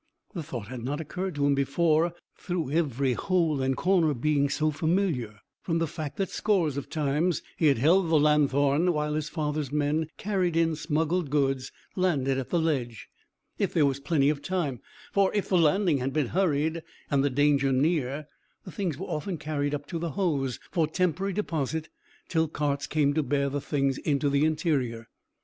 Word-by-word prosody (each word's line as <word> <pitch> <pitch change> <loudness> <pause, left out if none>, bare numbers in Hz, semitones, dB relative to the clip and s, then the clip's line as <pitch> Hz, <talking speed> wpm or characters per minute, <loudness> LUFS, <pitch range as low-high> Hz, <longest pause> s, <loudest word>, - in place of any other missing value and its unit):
The 175 - -4
thought 125 -9 -6
had 125 -2 -6
not 145 +4 -2
occurred 180 +3 -4
to 145 -1 +1
him 145 - +4
before, 160 +4 +2 0.2
through 175 -6 -3
every 140 -5 +1
hole 165 -2 +1
and 130 -1 0
corner 170 -5 +2
being 145 +2 +1
so 155 +2 +1
familiar, 155 - -1 0.2
from 165 -2 -1
the 165 - +1
fact 150 -2 -6
that 195 -2 -1
scores 180 -9 +1
of 140 -2 -5
times 155 +3 0
he 160 - +2
had 140 - +4
held 165 +8 +3
the 160 -2 +4
lanthorn 145 +2 +3
while 150 -1 -1
his 150 0 -2
father's 150 -3 -2
men 150 +2 0
carried 185 -5 0
in 165 -1 +2
smuggled 160 +1 -1
goods 135 -2 0 0.2
landed 140 -8 +1
at 130 - -5
the 175 - +1
ledge, 135 -9 -1 0.5
if - - -1
there 155 - +5
was 140 -1 0
plenty 140 -1 +2
of 145 -2 -5
time; 145 -6 -2 0.3
for, 195 -1 +3
if 205 - -1
the 190 - +2
landing 165 -1 +3
had 130 +1 -2
been 145 -5 0
hurried, 165 -3 +1 0.3
and 140 -1 +3
the 145 - +2
danger 140 0 +2
near, 145 0 0 0.4
the 185 - -9
things 175 -6 -2
were 190 - -5
often 170 +3 -3
carried 145 -1 -2
up 145 0 -6
to 165 +2 -4
the 165 -3 -3
Hoze 140 - 0
for 165 -4 +1
temporary 180 +4 0
deposit 160 -5 -2 0.4
till 160 -1 +1
carts 145 -2 -2
came 145 -2 +2
to 155 - +2
bear 140 0 0
the 145 +1 -3
things 135 -2 0
into 145 -1 0
the 140 +2 +3
interior. 140 -8 -1
150 Hz, 185 wpm, -27 LUFS, 140-165 Hz, 0.5 s, there